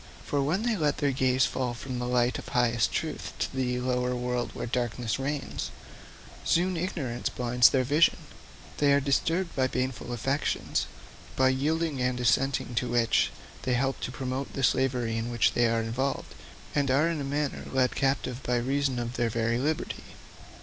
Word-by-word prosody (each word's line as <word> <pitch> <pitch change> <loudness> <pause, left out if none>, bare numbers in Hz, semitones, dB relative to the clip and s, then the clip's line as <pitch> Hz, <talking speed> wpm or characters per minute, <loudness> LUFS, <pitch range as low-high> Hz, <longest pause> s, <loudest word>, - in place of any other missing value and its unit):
For 145 - 0
when 165 +10 0
they 235 -1 +1
let 150 -6 +1
their 140 -1 +1
gaze 130 -1 +3
fall 125 0 -2
from 125 +1 -5
the 125 - -2
light 125 0 +2
of - - -10
highest 120 -2 +2
truth 155 -2 -3
to - - -3
the 125 -1 0
lower 125 0 0
world 125 0 -1
where - - -3
darkness 120 -1 -1
reigns, 140 +1 -3 0.7
soon 180 +2 +2
ignorance 155 -9 -2
blinds 125 -1 +4
their 130 -1 +2
vision; 145 +6 +4 0.6
they 145 -1 +4
are 140 - +5
disturbed 165 +6 0
by 130 -1 +2
baneful 130 -1 -3
affections, 135 +5 -1 0.5
by 130 0 +4
yielding 150 +2 0
and 125 0 0
assenting 125 +1 +1
to 120 +1 0
which 120 -1 +3 0.3
they 125 - 0
help 135 +2 0
to - - -4
promote 130 +2 -4
the 135 - -3
slavery 125 -3 +1
in 115 +1 -2
which 120 -1 +2
they 120 -1 +3
are 115 0 +1
involved, 125 +5 -2 0.4
and 140 -2 +1
are 140 +5 +4
in 165 -3 -1
a - - -2
manner 145 +1 -2
led 130 -1 +2
captive 135 -2 0
by 125 - 0
reason 135 +1 0
of 120 +1 -3
their 120 -1 +1
very 115 +1 0
liberty. 150 +4 -2
130 Hz, 175 wpm, -28 LUFS, 120-140 Hz, 0.7 s, are